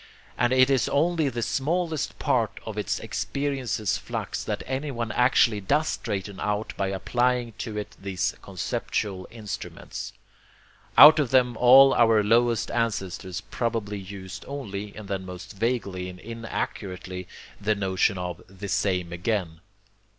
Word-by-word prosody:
And 120 Hz, +1 st, +2 dB
it 130 Hz, +1 st, +5 dB
is 135 Hz, -, +2 dB
only 160 Hz, 0 st, +2 dB
the 120 Hz, -2 st, -3 dB
smallest 160 Hz, +3 st, -1 dB
part -, -, 0 dB
of -, -, -5 dB
his -, -, -1 dB
experience's 125 Hz, 0 st, -2 dB
flux -, -, -4 dB
that -, -, -3 dB
anyone 130 Hz, -4 st, -3 dB
actually 120 Hz, -2 st, +3 dB
does 150 Hz, +11 st, +1 dB
straighten 100 Hz, -1 st, -4 dB
out 105 Hz, +1 st, -2 dB
by 100 Hz, -, -1 dB
applying 120 Hz, +5 st, 0 dB
to 110 Hz, -2 st, -4 dB
it 105 Hz, -, -5 dB
these 95 Hz, 0 st, -1 dB
conceptual 95 Hz, +1 st, -3 dB
instruments. 110 Hz, -3 st, -7 dB, 0.9 s
Out 155 Hz, +1 st, +11 dB
of 140 Hz, -5 st, +1 dB
them 125 Hz, -2 st, +3 dB
all 135 Hz, +3 st, +8 dB
our 115 Hz, -2 st, +4 dB
lowest 115 Hz, +2 st, +2 dB
ancestors 95 Hz, -5 st, -2 dB
probably 110 Hz, -4 st, -3 dB
used 95 Hz, 0 st, -8 dB
only, 105 Hz, -8 st, -5 dB
and 110 Hz, -2 st, -9 dB
then 95 Hz, -1 st, -3 dB
most 90 Hz, +2 st, -9 dB
vaguely 100 Hz, -4 st, -2 dB
and 90 Hz, 0 st, -10 dB
inaccurately, 95 Hz, -5 st, -5 dB, 0.3 s
the 105 Hz, +1 st, +1 dB
notion 95 Hz, -1 st, +1 dB
of 90 Hz, -1 st, -4 dB
'the 95 Hz, +2 st, -8 dB
same 95 Hz, -3 st, 0 dB
again.' 90 Hz, -3 st, -2 dB
105 Hz, 135 wpm, -26 LUFS, 95-125 Hz, 0.9 s, Out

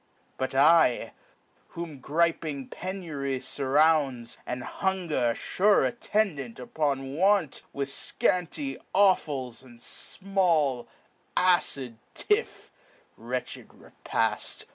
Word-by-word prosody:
But 130 Hz, 0 st, -3 dB
I, 150 Hz, -2 st, +4 dB, 0.6 s
whom 165 Hz, -5 st, -6 dB
griping 155 Hz, -1 st, 0 dB
penury 160 Hz, -8 st, -4 dB
furrounds, 135 Hz, -1 st, +1 dB
And 125 Hz, 0 st, -3 dB
hunger, 170 Hz, -, 0 dB
fure 205 Hz, +2 st, +3 dB
attendant 185 Hz, -, -1 dB
upon 135 Hz, 0 st, -2 dB
want, 190 Hz, -3 st, +2 dB
With 140 Hz, 0 st, -3 dB
fcanty 180 Hz, -, -1 dB, 0.2 s
offals, 145 Hz, -, +2 dB
and 120 Hz, -3 st, -16 dB
fmall 165 Hz, -7 st, 0 dB, 0.5 s
acid 140 Hz, -10 st, +2 dB, 0.2 s
tiff 420 Hz, +2 st, -1 dB, 0.4 s
(Wretched -, -, -5 dB
repail -, -, -2 dB
150 Hz, 85 wpm, -27 LUFS, 130-185 Hz, 0.6 s, I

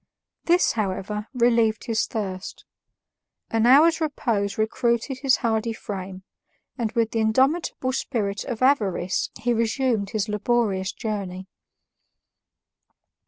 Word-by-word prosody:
This, 350 Hz, +1 st, +4 dB
however, 210 Hz, 0 st, -3 dB
relieved 235 Hz, -3 st, +2 dB
his 225 Hz, -1 st, 0 dB
thirst; 195 Hz, -4 st, -5 dB, 0.9 s
an 225 Hz, +1 st, +2 dB
hour's 320 Hz, +6 st, +6 dB
repose 225 Hz, -10 st, -1 dB
recruited 235 Hz, +3 st, 0 dB
his 270 Hz, -1 st, +3 dB
hardy 225 Hz, 0 st, 0 dB
frame, 190 Hz, -3 st, -7 dB, 0.5 s
and 230 Hz, -4 st, -2 dB
with 230 Hz, -1 st, +1 dB
the 225 Hz, -, -1 dB
indomitable 260 Hz, +5 st, +1 dB
spirit 205 Hz, -7 st, -2 dB
of 245 Hz, -2 st, -3 dB
avarice 200 Hz, -9 st, +1 dB
he 240 Hz, +1 st, +1 dB
resumed 230 Hz, -2 st, 0 dB
his 215 Hz, 0 st, -1 dB
laborious 210 Hz, -3 st, 0 dB
journey. 195 Hz, -5 st, -5 dB
225 Hz, 110 wpm, -24 LUFS, 205-250 Hz, 0.9 s, hour's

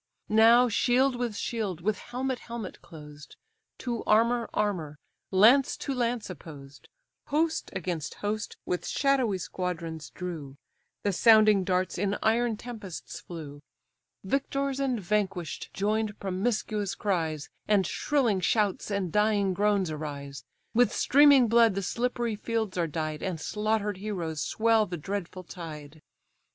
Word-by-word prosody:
Now 230 Hz, +3 st, +6 dB
shield 250 Hz, +3 st, +2 dB
with 240 Hz, -3 st, -2 dB
shield, 205 Hz, -7 st, -3 dB
with 210 Hz, +3 st, 0 dB
helmet 255 Hz, +1 st, -3 dB
helmet 230 Hz, -5 st, -7 dB
closed, 150 Hz, -2 st, -12 dB, 0.4 s
To 240 Hz, -3 st, -3 dB
armour 230 Hz, +2 st, +3 dB
armour, 170 Hz, -8 st, -2 dB, 0.3 s
lance 230 Hz, +8 st, +5 dB
to 275 Hz, -, -3 dB
lance 240 Hz, -2 st, -1 dB
opposed, 145 Hz, -5 st, -11 dB, 0.4 s
Host 315 Hz, +2 st, 0 dB
against 175 Hz, -4 st, -3 dB
host 210 Hz, +1 st, -3 dB
with 180 Hz, -, -2 dB
shadowy 260 Hz, -8 st, +1 dB
squadrons 170 Hz, -4 st, -4 dB
drew, 160 Hz, -7 st, -7 dB, 0.5 s
The 205 Hz, -, +1 dB
sounding 215 Hz, -1 st, +6 dB
darts 185 Hz, -1 st, 0 dB
in 200 Hz, +1 st, 0 dB
iron 230 Hz, 0 st, +2 dB
tempests 215 Hz, -7 st, -8 dB
flew, 150 Hz, -4 st, -9 dB, 0.6 s
Victors 275 Hz, +5 st, -1 dB
and 260 Hz, -4 st, 0 dB
vanquish'd 190 Hz, -4 st, -2 dB
join'd 210 Hz, +1 st, -1 dB
promiscuous 205 Hz, +1 st, -1 dB
cries, 160 Hz, -7 st, -2 dB, 0.2 s
And 205 Hz, -3 st, +3 dB
shrilling 245 Hz, -, +1 dB
shouts 205 Hz, +2 st, +1 dB
and 200 Hz, -4 st, -1 dB
dying 210 Hz, -2 st, +2 dB
groans 200 Hz, -3 st, +1 dB
arise; 145 Hz, -2 st, -6 dB, 0.3 s
With 245 Hz, +1 st, +4 dB
streaming 280 Hz, -3 st, +6 dB
blood 230 Hz, -2 st, +5 dB
the 195 Hz, -, -2 dB
slippery 240 Hz, +1 st, -1 dB
fields 220 Hz, -2 st, -2 dB
are 170 Hz, -2 st, 0 dB
dyed, 155 Hz, 0 st, -3 dB
And 180 Hz, -4 st, -3 dB
slaughter'd 210 Hz, +2 st, -1 dB
heroes 175 Hz, -7 st, -4 dB
swell 225 Hz, -1 st, +2 dB
the 175 Hz, -, -4 dB
dreadful 185 Hz, +2 st, -5 dB
tide. 155 Hz, -4 st, -9 dB
205 Hz, 130 wpm, -28 LUFS, 175-230 Hz, 0.6 s, Now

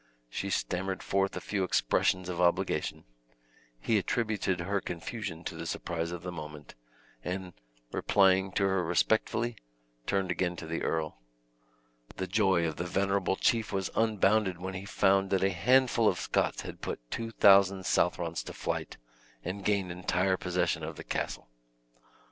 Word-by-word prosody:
She -, -, -3 dB
stammered 95 Hz, +1 st, -2 dB
forth 95 Hz, 0 st, 0 dB
a -, -, -1 dB
few 100 Hz, -2 st, -2 dB
expressions 90 Hz, +2 st, +1 dB
of 90 Hz, -1 st, -2 dB
obligation; 85 Hz, -1 st, +1 dB, 0.8 s
he 110 Hz, -, +2 dB
attributed 105 Hz, -3 st, -1 dB
her 100 Hz, +3 st, -1 dB
confusion 85 Hz, 0 st, -5 dB
to -, -, -5 dB
the -, -, -6 dB
surprise 85 Hz, -1 st, -3 dB
of 85 Hz, 0 st, -6 dB
the 90 Hz, -, -4 dB
moment, 75 Hz, -3 st, -8 dB, 0.5 s
and, 90 Hz, 0 st, -4 dB, 0.4 s
replying 95 Hz, -1 st, +3 dB
to -, -, +1 dB
her 95 Hz, -2 st, +2 dB
respectfully, 110 Hz, +6 st, +1 dB, 0.5 s
turned 95 Hz, -2 st, +1 dB
again 90 Hz, -1 st, 0 dB
to 80 Hz, -, -7 dB
the 85 Hz, +1 st, -3 dB
earl. 80 Hz, -6 st, -2 dB, 1.0 s
The 95 Hz, -, -2 dB
joy 95 Hz, -3 st, +2 dB
of 80 Hz, -2 st, -3 dB
the 90 Hz, -, -3 dB
venerable 95 Hz, 0 st, +1 dB
chief 115 Hz, +1 st, +1 dB
was 95 Hz, -3 st, -2 dB
unbounded, 105 Hz, -3 st, +2 dB
when 95 Hz, +2 st, -5 dB
he 95 Hz, +1 st, -6 dB
found 95 Hz, -1 st, +2 dB
that 95 Hz, -1 st, +1 dB
a 95 Hz, -, +3 dB
handful 120 Hz, +4 st, +3 dB
of 90 Hz, -, +2 dB
Scots -, -, 0 dB
had -, -, -8 dB
put -, -, -4 dB
two 115 Hz, 0 st, -3 dB
thousand 100 Hz, -3 st, +5 dB
Southrons 85 Hz, -1 st, +1 dB
to -, -, -7 dB
flight, -, -, -3 dB, 0.5 s
and 95 Hz, +3 st, -4 dB
gained 100 Hz, -3 st, +1 dB
entire 90 Hz, +1 st, +1 dB
possession 90 Hz, -1 st, 0 dB
of -, -, -5 dB
the -, -, -8 dB
castle. -, -, -3 dB
95 Hz, 155 wpm, -30 LUFS, 90-100 Hz, 1.0 s, thousand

